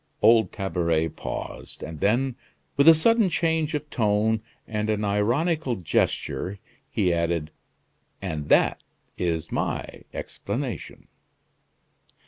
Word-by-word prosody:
Old 110 -4 +6
Tabaret 85 -5 0
paused, - - -6
and 80 -1 -7
then, 120 - +2 0.4
with 140 +2 +4
a 165 - +12
sudden 225 +4 +4
change 160 -2 +1
of 150 0 -3
tone 110 0 +2 0.3
and 105 -1 -2
an 105 -1 0
ironical 125 - +1
gesture, 95 +2 -1 0.3
he 90 -4 +1
added: 85 -2 -1 0.7
"And 80 -6 -4
that - - +4 0.3
is 85 -2 -2
my - - -3
explanation." - - -5
105 Hz, 110 wpm, -25 LUFS, 85-140 Hz, 0.7 s, a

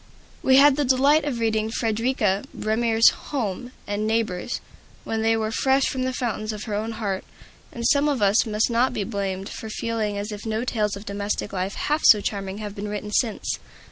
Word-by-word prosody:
We 260 0 +5
had 285 0 +7
the 295 - +2
delight 280 +4 +4
of 280 -5 -2
reading 220 -1 0
Frederika 225 -3 0
Bremer's 225 +1 +3 0.2
"Home" 245 -3 -3
and 205 +1 -2
"Neighbors" 220 -1 -1 0.4
when 225 0 -2
they 225 0 +2
were 220 0 -1
fresh 265 +3 +2
from 260 -1 -1
the 260 - 0
fountains 225 -4 -2
of 215 -1 -6
her 215 - -5
own 220 +2 -2
heart; 200 -4 -3 0.5
and 235 -1 -5
some 285 +3 +4
of 280 -4 0
us 205 +2 +3
must 215 +2 +1
not 245 +2 +2
be 220 -4 -1
blamed 195 -2 -3
for 220 - -7
feeling 220 -2 -2
as 205 +2 -4
if 210 0 -7
no 220 +1 -2
tales 210 -5 -1
of 200 +1 -9
domestic 200 0 -3
life 190 +1 -2
half 300 +1 0
so 210 - +8
charming 195 -1 -3
have 210 -1 -6
been 205 0 -5
written 210 0 -5
since. 220 0 0
220 Hz, 200 wpm, -24 LUFS, 205-240 Hz, 0.5 s, so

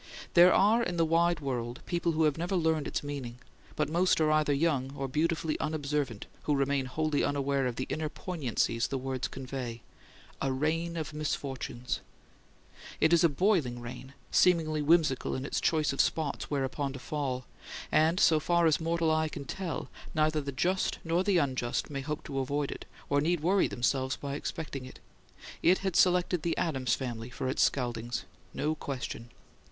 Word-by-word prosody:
There 175 +1 +8
are 215 +4 +4
in 180 -6 -2
the 165 - +3
wide 165 0 +2
world 120 -3 -3
people 170 -1 0
who 160 +1 +2
have 150 -2 +3
never 175 +4 -2
learned 160 -4 +1
its - - -2
meaning; 135 -5 -5 0.4
but 150 - +1
most 175 +4 +2
are 155 -1 +3
either 155 -1 +3
young 140 -3 +1
or 135 -1 -3
beautifully 160 +3 0
unobservant 145 -7 -2 0.2
who 150 - +2
remain 140 -1 +1
wholly 155 +2 0
unaware 140 -1 +1
of 120 - -3
the 130 - -3
inner 155 -1 -2
poignancies 125 - -1
the 135 - -2
words 130 -1 -2
convey: 130 -3 -6 0.6
"a 135 - +1
rain 165 +5 -1
of 155 -1 -4
misfortunes." 135 -4 -3 1.0
It 160 +2 +4
is 170 - +5
a 170 - +6
boiling 155 - +1
rain, 125 +3 -9 0.2
seemingly 160 -4 +3
whimsical 150 -3 +2
in 130 - -4
its - - -2
choice 155 -3 +2
of - - +3
spots 155 -3 -1
whereon 140 0 -1
to - - -6
fall; 130 -2 -3 0.5
and, 160 +4 +3
so 160 -6 +5
far 170 +2 +2
as 160 0 +3
mortal 165 0 +1
eye 155 0 +1
can 140 - -7
tell, 180 +4 -4 0.3
neither 155 0 +2
the 140 0 -4
just 180 +8 0
nor 170 +2 +1
the 195 -2 +3
unjust 130 -4 -1
may 140 -1 -3
hope 150 +2 -4
to 135 - -3
avoid 140 +2 -1
it, - - -7 0.2
or 145 0 +2
need 170 +1 +1
worry 185 +4 +3
themselves 130 +2 0
by 140 -1 -5
expecting 145 -2 -4
it. 130 - -11 0.6
It 180 +2 +5
had 190 -3 0
selected 180 -1 +3
the 170 +1 -1
Adams 130 -7 +1
family 120 -3 -5
for 125 +2 -4
its 130 - 0
scaldings; 120 -4 0 0.3
no 150 +2 -1
question. 125 -5 -5
150 Hz, 180 wpm, -30 LUFS, 130-165 Hz, 1.0 s, There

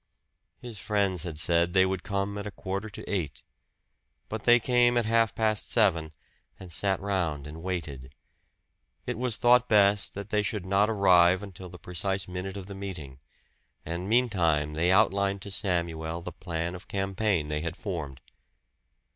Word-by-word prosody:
His 120 -5 -9
friends 100 -5 0
had 85 -2 -4
said 85 +2 +3
they 95 -1 +5
would 95 -1 -2
come 100 0 -2
at 100 - -5
a - - -3
quarter 95 +3 -5
to 100 - -10
eight. 75 -10 -3 0.9
But 110 0 -5
they 120 0 +7
came 120 0 +3
at 120 - +1
half 115 0 +2
past 110 -1 0
seven, 85 -9 +2 0.5
and 95 -2 -10
sat 95 +2 +1
round 85 -8 -2
and 75 +2 -9
waited. 75 -8 -5 0.9
It - - -3
was 125 -1 -1
thought 125 +1 +4
best 100 -1 +3
that 100 +1 -7
they 105 - +2
should 105 -2 -3
not 100 +3 +2
arrive 95 -3 +4
until 95 -2 -9
the 90 - -11
precise 95 +2 -2
minute 95 +2 -5
of 95 - -7
the 100 - -8
meeting; 90 -9 -7 0.7
and 85 +4 -4
meantime 85 -11 +2
they 85 +4 +1
outlined 100 -1 +2
to 100 - -7
Samuel 85 -4 0
the - - -7
plan 85 -1 -4
of 90 +1 -10
campaign 95 -4 -1
they 75 0 -2
had 85 0 -4
formed. 80 -10 -5
95 Hz, 165 wpm, -28 LUFS, 85-105 Hz, 0.9 s, they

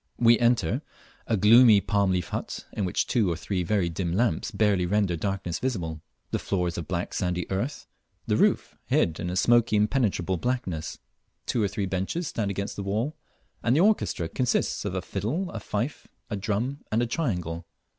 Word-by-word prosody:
We 115 -1 +5
enter 120 -9 +2 0.5
a 110 - +2
gloomy 110 +2 +7
palm 100 0 +1
leaf 90 -2 -1
hut, - - -4
in 105 - -1
which 90 - 0
two 110 -7 +2
or - - -1
three 90 +3 -2
very 90 0 +1
dim 85 0 -2
lamps 110 -2 +1
barely 100 -5 +2
render 100 -2 +1
darkness 95 -1 -2
visible. 85 -12 -3 0.3
The - - 0
floor 90 -3 -1
is 85 - -3
of 85 - -6
black 90 0 -3
sandy 90 -2 -1
earth, 110 +10 -2 0.4
the - - +1
roof - - +2
hid 80 -1 +1
in 90 - -3
a 90 - -3
smoky 120 +2 +4
impenetrable 105 -5 +1
blackness; 95 -8 -2 0.5
two 120 - 0
or 105 - +3
three 100 +1 -2
benches 95 - -2
stand 105 -6 -2
against 100 0 -3
the - - -3
walls, 110 +9 -1 0.5
and 120 +2 +2
the 160 - +4
orchestra 200 - +2
consists 125 +9 0
of - - -2
a - - -2
fiddle, 165 - -2
a 115 - -5
fife, 105 +7 -3 0.2
a - - 0
drum, 110 +7 -2
and 115 +2 +2
a - - +2
triangle. 90 - -2
100 Hz, 185 wpm, -27 LUFS, 90-120 Hz, 0.5 s, gloomy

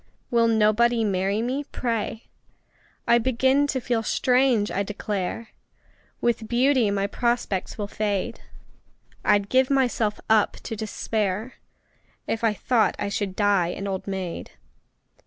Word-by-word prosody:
Will 230 -1 +4
nobody 225 +1 +3
marry 200 +1 0
me, 260 +4 -2
pray! 230 -3 -3 0.8
I 235 - +5
begin 260 +4 +2
to 270 - -1
feel 240 -2 -1
strange, 250 -2 +2
I 200 - -1
declare! 205 +1 -4 0.7
With 230 -2 0
beauty 250 -1 +3
my 200 0 0
prospects 235 -3 -1
will 205 -2 -3
fade 205 -2 -2 0.8
I'd 205 -1 +3
give 260 +3 +3
myself 245 -6 +1
up 220 -1 +3
to 225 - -5
despair 215 +1 -3 0.7
If 225 - -3
I 225 - +4
thought 230 +1 +2
I 200 - -2
should 200 -2 -3
die 200 -4 +2
an 185 +3 -5
old 190 0 -4
maid! 190 -3 -5
220 Hz, 130 wpm, -24 LUFS, 200-240 Hz, 0.8 s, I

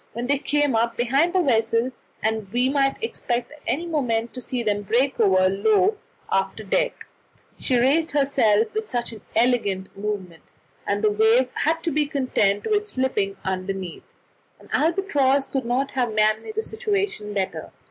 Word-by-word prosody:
When 235 +2 -4
they 280 +2 +1
came 290 -3 +1
up 230 +1 0
behind 270 +8 +2
the 370 -1 +3
vessel, 230 -2 +1 0.3
and 220 -3 -1
we 245 +3 +2
might 275 -1 +1
expect 245 - -2
at 300 0 -15
any 285 +8 0
moment 235 -8 -1
to 255 - -6
see 250 -1 -3
them 205 -2 0
break 245 +7 0
over 190 -4 +4
the 185 - +4
low 395 - +2 0.4
after 195 +3 0
deck, 215 - -1 0.5
she 255 - 0
just 240 - +3
raised 310 +5 +3
herself 230 -7 +2
with 435 0 -3
an 235 -2 -3
elegant 220 -5 +1
movement, 195 -5 -5 0.5
and 205 +1 -1
the 215 - +4
wave 220 +4 +3
had 325 +2 0
to 335 - 0
be 295 0 +1
content 235 -8 +1
with 420 -1 +1
slipping 215 - -1
underneath. 190 -1 -5 0.4
An - - -18
albatross 290 -6 +2
could 270 -2 -3
not 255 +3 0
have 245 -4 -1
managed 215 - +1
the 440 - -1
situation 400 - -2
better. 190 -2 -3
245 Hz, 170 wpm, -23 LUFS, 210-290 Hz, 0.5 s, over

